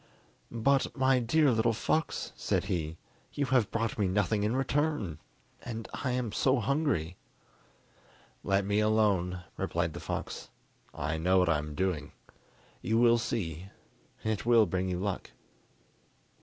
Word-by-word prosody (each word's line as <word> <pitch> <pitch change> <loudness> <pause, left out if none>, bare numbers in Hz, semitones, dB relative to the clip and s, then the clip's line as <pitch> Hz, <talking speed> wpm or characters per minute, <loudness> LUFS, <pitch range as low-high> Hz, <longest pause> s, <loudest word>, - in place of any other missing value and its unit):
"But, 135 +5 +1
my 130 -1 +4
dear 140 +4 +3
little 115 0 +2
fox," 160 +8 -1
said - - 0
he, 80 -2 -3 0.4
"you 145 - 0
have 130 -6 +2
brought 115 -1 -2
me 100 - +2
nothing 100 +2 +1
in 105 +4 0
return, 135 - 0 0.4
and 115 -2 -6
I 130 - -2
am 125 -3 -1
so 130 +4 +2
hungry!" 135 - 0 1.3
"Let 100 0 +1
me 100 +1 +1
alone," 100 -5 +2
replied - - -1
the - - -6
fox; - - -5 0.4
"I 80 +3 -3
know 90 +3 +3
what 90 -2 +3
I 80 -2 +3
am 75 0 -6
doing. 90 -6 -2 0.7
You 110 - +1
will 120 0 +5
see, 95 -7 -3 0.6
it 110 -2 -1
will 115 -2 +5
bring 95 +1 -1
you 90 - -1
luck." 100 0 -3
110 Hz, 145 wpm, -30 LUFS, 90-125 Hz, 1.3 s, will